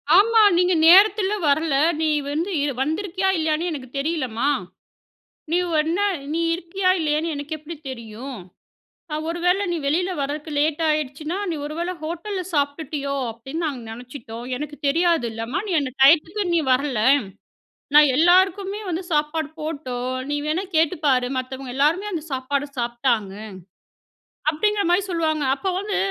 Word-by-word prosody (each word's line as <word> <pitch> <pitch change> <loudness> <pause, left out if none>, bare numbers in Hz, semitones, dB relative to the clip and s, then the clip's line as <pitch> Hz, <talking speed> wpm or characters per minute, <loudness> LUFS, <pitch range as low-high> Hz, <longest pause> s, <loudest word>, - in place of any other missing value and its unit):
ஆமா. 445 +3 +6 0.2
"நீங்க 360 0 +3
நேரத்தில 395 +2 +6 0.2
வரல 285 0 +2 0.3
நீ 315 - +2 0.2
வந்து 330 +6 -1
இது 285 -2 -1
வந்திருக்கியா 375 +4 -1
இல்லையான்னே 320 +2 0
எனக்கு 260 -5 -6
தெரியலம்மா? 275 -4 -1 1.0
நீ 345 - +3 0.2
என்ன 335 +5 -1 0.3
நீ 330 - 0
இருக்கியா 370 +2 -1
இல்லையான்னு 310 +1 0
எனக்கு 290 +2 -5
எப்படி 315 +2 -9
தெரியும்? 235 +1 -8 0.7
நான் 305 +1 -3
ஒரு 335 - -3
வேளை 365 +3 +3
நீ 345 - 0
வெளில 355 +6 +1
வரதுக்கு 295 +3 -4
லேட் 305 +2 +1
ஆகிடுச்சுன்னா 305 +3 -2
நீ - - -2
ஒருவேளை 335 +4 -3
ஹோட்டல்ல 350 +5 -4
சாப்பிட்டுட்டியோ 285 -1 -1 0.2
அப்படின்னு 270 +9 -5
நாங்க 270 -5 -4
நினைச்சிட்டோம். 245 0 -9
எனக்கு 295 +2 -6
தெரியாதுல்லம்மா 275 -5 0
நீ - - -1
அந்த 270 - -3
டைத்துக்கு 330 +8 +5
நீ 335 - +3
வரல. 255 -3 +1 0.9
நான் 300 -1 +8
எல்லாருக்குமே 380 +4 +3
வந்து 350 +2 -2
சாப்பாடு 300 0 0
போட்டோம் 255 -5 -4 0.2
நீ 290 - 0
வேணா 325 +6 -1
கேட்டுப்பாரு 290 -5 +2
மத்தவங்க 255 0 -6
எல்லாருமே 320 +9 +2
அந்த 330 - -3
சாப்பாடு 275 +2 -1
சாப்பிட்டாங்க." 235 -4 0 1.2
அப்படிங்கிற 410 +6 +1
மாரி 355 +3 +4
சொல்லுவாங்க 315 -3 0
அப்போ 380 +7 -3
வந்து 400 0 -2
310 Hz, 135 wpm, -22 LUFS, 275-345 Hz, 1.2 s, நான்